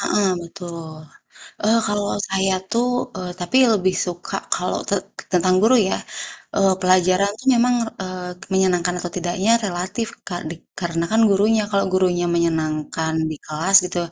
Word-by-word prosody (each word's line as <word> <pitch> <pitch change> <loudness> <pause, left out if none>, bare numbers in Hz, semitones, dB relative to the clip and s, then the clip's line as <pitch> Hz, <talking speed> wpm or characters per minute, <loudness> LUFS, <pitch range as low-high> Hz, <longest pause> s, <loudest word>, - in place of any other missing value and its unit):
Heeh, 200 0 +2
betul. 170 -2 -8 0.7
Eee, 225 +2 +4
kalau 205 0 -1 0.2
saya 190 0 +1 0.2
tuh, 240 +2 +2 0.3
eee, 180 -1 -5
tapi 180 +9 0 0.2
lebih 185 -2 +2
suka 175 0 -5 0.2
kalau - - -2
te - - +1 0.4
tentang 185 +1 +3
guru 225 +5 +5
ya, 205 -6 +2 0.6
eee, 195 -1 +3
pelajaran 185 +2 +3
tuh 265 - -12
memang, 245 +1 +3 0.3
eee, 185 -1 -6 0.2
menyenangkan 180 -2 +2
atau 175 -1 -5
tidaknya 180 +4 0
relatif, 190 +4 -3 0.2
Kak, 175 -2 -4
dik 165 0 -8
karena 170 -2 -2
kan 225 - +4
gurunya. 210 +3 +3
Kalau 200 -1 +1
gurunya 180 -2 +2
menyenangkan 160 -1 -1 0.2
di 155 - -5
kelas 160 +6 -2
gitu, 180 - -4
185 Hz, 150 wpm, -21 LUFS, 175-200 Hz, 0.7 s, guru